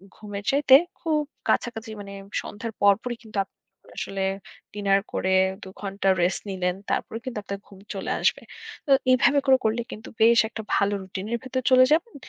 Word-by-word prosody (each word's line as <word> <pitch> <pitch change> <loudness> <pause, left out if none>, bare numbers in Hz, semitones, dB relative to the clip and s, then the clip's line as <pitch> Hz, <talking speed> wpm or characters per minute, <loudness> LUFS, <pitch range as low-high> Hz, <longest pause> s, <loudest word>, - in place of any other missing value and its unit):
ঘুমের 205 -1 -7
চাইতে 275 -1 +6 0.2
খুব 310 -3 +1 0.3
কাছাকাছি 225 -1 0
মানে 200 0 -9 0.3
সন্ধ্যার 220 +2 -6
পরপরই 210 +4 +3
কিন্তু 215 -2 -9
আপনি - - -29 0.4
আসলে 195 -1 -3 0.5
dinner 200 -1 +3
করে 190 - 0 0.3
২ 190 - -8
ঘণ্টা 195 -1 -1
rest 175 +1 +1
নিলেন। 180 -2 -1 0.2
তারপরেও 225 - -2
কিন্তু 255 -4 -5
আপনার 200 -1 -5
ঘুম 195 - -15 0.2
চলে 195 - -3
আসবে। - - +2 0.5
তো - - 0 0.2
এভাবে 255 +3 +4
করে 265 -1 +7
করলে 220 +2 +1
কিন্তু 215 - -9
বেশ 230 +1 +6
একটা 220 - -6
ভালো 200 0 +2
routine 190 +1 -6
এর - - +1
ভেতর 260 0 -2
চলে 255 0 +8
যাবেন। 335 +9 +2
215 Hz, 170 wpm, -25 LUFS, 195-250 Hz, 0.5 s, চলে